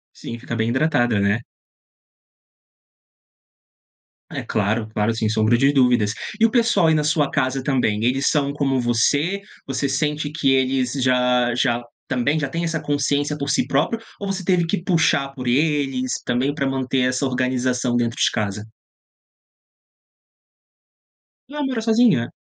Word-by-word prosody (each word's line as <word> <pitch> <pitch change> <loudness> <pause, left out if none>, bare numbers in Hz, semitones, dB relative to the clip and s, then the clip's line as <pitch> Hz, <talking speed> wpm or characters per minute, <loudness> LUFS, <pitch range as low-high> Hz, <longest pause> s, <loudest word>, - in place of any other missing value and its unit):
Sim, 115 - -7
fica 120 0 -5
bem 110 0 0
hidratada, 120 -5 +1
né? 100 +3 +1 2.9
É - - -4
claro, 110 +1 -1
claro, 105 +2 0
sem 110 -1 -1
sombra 110 +2 +2
de 135 +3 +3
dúvidas. 120 -6 +3 0.3
E 225 - +5
o 230 - +4
pessoal 235 -8 +3
aí 160 - +4
na 150 - +1
sua 150 -1 +1
casa 130 -2 -1
também, 125 -6 0
eles 135 +3 +1
são 140 -2 0
como 135 -2 0
você? 145 - +1 0.3
Você 135 +1 -2
sente 150 +2 -1
que 150 -3 +1
eles 130 -1 +1
já 125 -2 +2
já 120 -1 +1 0.3
também 135 +4 0
já 140 - -1
têm 170 +3 -3
essa 165 -1 -1
consciência 145 0 -1
por 140 -1 -4
si - - +1
próprio 155 +12 0 0.2
ou 200 - -4
você 190 -1 -4
teve 180 -1 +2
que 175 +3 -2
puxar 160 -6 +2
por 125 -2 -7
eles 135 -2 0
também, 130 +4 0
pra 140 -2 -1
manter 130 0 -1
essa 130 +2 +1
organização 125 -1 0
dentro 120 -1 -1
de - - +2
casa? 105 0 -3 2.8
Ah, 295 0 -4
mora 260 -4 -2
sozinha? 220 - +3
135 Hz, 150 wpm, -21 LUFS, 120-150 Hz, 2.9 s, E